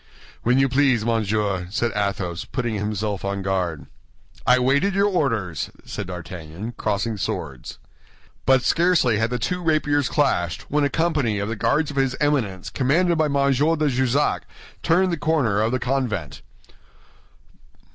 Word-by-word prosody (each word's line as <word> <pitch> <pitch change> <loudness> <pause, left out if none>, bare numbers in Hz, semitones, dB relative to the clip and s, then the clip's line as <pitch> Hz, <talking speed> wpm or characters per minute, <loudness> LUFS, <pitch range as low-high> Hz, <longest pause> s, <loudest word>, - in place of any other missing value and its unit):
"When 125 +2 +2
you 135 0 +4
please, 130 -4 +2
monsieur," 105 -5 0
said 115 +4 -1
Athos, 100 -4 -2
putting 120 -3 -3
himself 105 -1 -2
on 100 0 -2
guard. 90 -5 -2 0.6
"I 125 - +6
waited 140 +10 +2
your 200 +1 +3
orders," 115 - -1 0.2
said 105 -3 -5
D'Artagnan, 90 +3 -7
crossing 105 +2 -1
swords. 70 -8 -5 0.7
But 130 -1 +5
scarcely 165 -11 +3
had 110 +1 +1
the 125 - -1
two 180 +10 -2
rapiers 150 -4 +1
clashed, 90 - 0
when 150 +1 +2
a 140 - +2
company 150 -10 0
of 100 +1 -2
the 115 - -2
Guards 140 +8 +1
of 140 - -9
his 135 -2 +1
Eminence, 120 -12 0
commanded 170 +7 +2
by 155 - +4
M. 145 - -2
de 145 +3 +2
Jussac, 130 +2 +1 0.3
turned 180 +2 +2
the 170 - -1
corner 145 -10 +1
of 110 +2 +1
the 130 - +1
convent. 120 - -2
125 Hz, 150 wpm, -23 LUFS, 100-145 Hz, 0.7 s, I